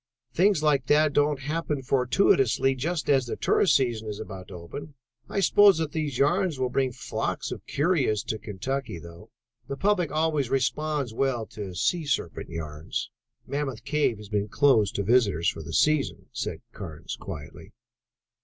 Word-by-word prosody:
Things 185 -3 +3
like 140 -4 +2
that 150 0 +4
don't 145 -1 +2
happen 150 -1 -2
fortuitously 135 - +3
just 155 +6 -2
as 135 -3 +3
the - - -3
tourist 190 - +3
season 120 -5 0
is 105 -1 -5
about 95 -4 -8
to 95 - -10
open. 115 - -8 0.3
I 200 - -1
suppose 200 -1 +6
that 160 -2 -2
those 150 -5 -2
yarns 175 +3 +2
will 130 -1 -1
bring 130 -1 +1
flocks - - -3
of - - -4
the - - -14
curious 140 - +1
to 110 - -3
Kentucky 115 +2 -4
though: 85 +6 -12 0.4
the 140 0 -4
public 195 -4 +1
always 155 -4 +1
responds 140 -1 0
well 125 -2 0
to 100 -4 -7
sea 160 - 0
serpent 85 - -2
yarns." 80 -1 -5 0.3
"Mammoth 140 -5 -3
Cave 145 -6 +1
has 105 -1 -11
been 105 -1 0
closed 110 -1 +3
to 100 - 0
visitors 100 -7 +3
for - - -6
the 80 +1 -8
season," 120 - +1
said - - -4
Carnes 80 0 -7
quietly. 75 -2 -9
135 Hz, 165 wpm, -26 LUFS, 105-150 Hz, 0.4 s, suppose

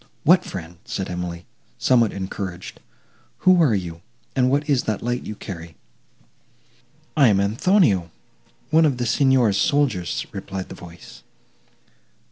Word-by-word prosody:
"What 180 +3 +5
friend?" 85 -2 -8
said 95 -2 -4
Emily, 90 -1 -5 0.3
somewhat 120 -4 +3
encouraged 95 -1 -6 0.7
"who 185 -2 +6
are 135 -9 +4
you, 85 -3 -5 0.3
and 130 -1 +3
what 145 +2 0
is 140 -4 +1
that 110 -2 -2
light 120 +1 -2
you 110 - -5
carry?" 85 -5 -8 1.4
"I 140 -4 +6
am 105 -3 +4
Anthonio, 105 - +2 0.6
one 160 +1 +5
of 140 -5 +1
the 120 - -2
Signor's 125 -5 +3
soldiers," 110 -6 0
replied 95 -1 -6
the - - -7
voice. 85 -7 -13
105 Hz, 130 wpm, -22 LUFS, 90-135 Hz, 1.4 s, who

